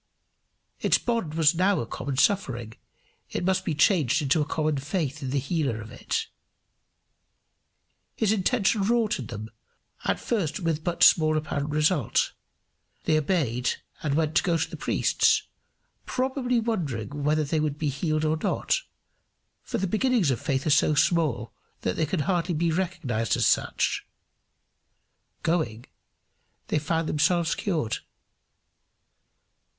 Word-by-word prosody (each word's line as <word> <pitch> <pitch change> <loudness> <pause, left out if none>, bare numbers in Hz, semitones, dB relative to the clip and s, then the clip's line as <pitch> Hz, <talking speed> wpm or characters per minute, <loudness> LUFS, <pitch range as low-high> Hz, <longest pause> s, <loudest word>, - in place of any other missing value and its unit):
Its - - +3
bond 230 -11 -2
was 160 -1 +4
now 185 +3 +2
a - - -2
common 130 +3 -5
suffering; 130 - +1 0.6
it - - -3
must 190 0 +1
be 160 - -2
changed 150 - +2
to 155 - +4
a - - 0
common 155 -1 -1
faith 145 0 -3
in 135 - -3
the 140 - -1
healer 140 -4 -1
of 110 +1 -9
it. 445 - -2 1.9
His 220 -3 +1
intention 215 0 +2
wrought 220 -1 +1
in 125 - -6
them 110 -1 -7 0.5
at - - 0
first 200 -7 -1
with 165 -3 -1
but 175 0 0
small 155 -1 +6
apparent 150 -1 -2
result. 150 - +1 0.7
They 160 - +2
obeyed, 140 -7 0 0.3
and 145 -2 0
went 155 -1 +1
to - - +5
go 170 -3 +1
to - - -1
the - - -8
priests, - - +2 0.6
probably 255 -1 0
wondering 165 - -2
whether 150 +2 +2
they 155 +2 0
would 150 -1 -1
be 150 -1 -1
healed 155 +3 -1
or 155 +1 +1
not, - - 0 0.8
for - - -4
the 195 - 0
beginnings 220 - +2
of 125 - -2
faith 135 -3 -1
are 155 - +2
so 150 +1 +4
small 140 - +1 0.3
that 90 - -1
they 160 - 0
can 165 +1 -1
hardly 175 +2 0
be 165 +2 +1
recognized 160 - -1
as - - +2
such. - - +1 1.4
Going, 125 -9 -1 0.8
they - - +2
found 160 +2 -1
themselves 170 +2 +2
cured. 155 - -1
155 Hz, 145 wpm, -26 LUFS, 140-185 Hz, 1.9 s, small